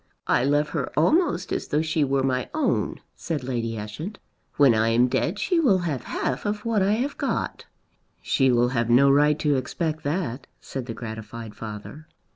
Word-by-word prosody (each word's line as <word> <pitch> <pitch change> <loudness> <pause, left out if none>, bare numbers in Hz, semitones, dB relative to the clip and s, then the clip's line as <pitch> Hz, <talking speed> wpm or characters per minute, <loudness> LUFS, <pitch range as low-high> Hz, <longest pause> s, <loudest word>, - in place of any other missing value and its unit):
"I 120 - +2
love 145 +2 +2
her - - -3
almost 180 - +2
as - - -2
though 150 +2 +1
she 160 -1 +1
were 135 -1 +1
my 130 -1 0
own," 310 - 0
said 155 -6 -4
Lady 115 -3 -2
Ushant. 150 - -6 0.4
"When 140 -4 +6
I 110 0 +2
am 120 +2 +4
dead 165 - 0
she 355 - +1
will 245 -12 +4
have 145 -6 -3
half 125 - -2
of 210 +1 -3
what 225 -3 +1
I 195 +2 +3
have 255 +6 -2
got." - - -2 0.5
"She 135 -2 +2
will 120 0 +3
have 120 -2 -1
no 135 +3 +6
right 150 +1 +4
to 145 -3 +1
expect 155 +4 -2
that," 145 -4 -2
said 130 -2 -6
the 115 - -5
gratified 110 -1 -7
father. 110 +8 -8
140 Hz, 185 wpm, -25 LUFS, 120-165 Hz, 0.5 s, When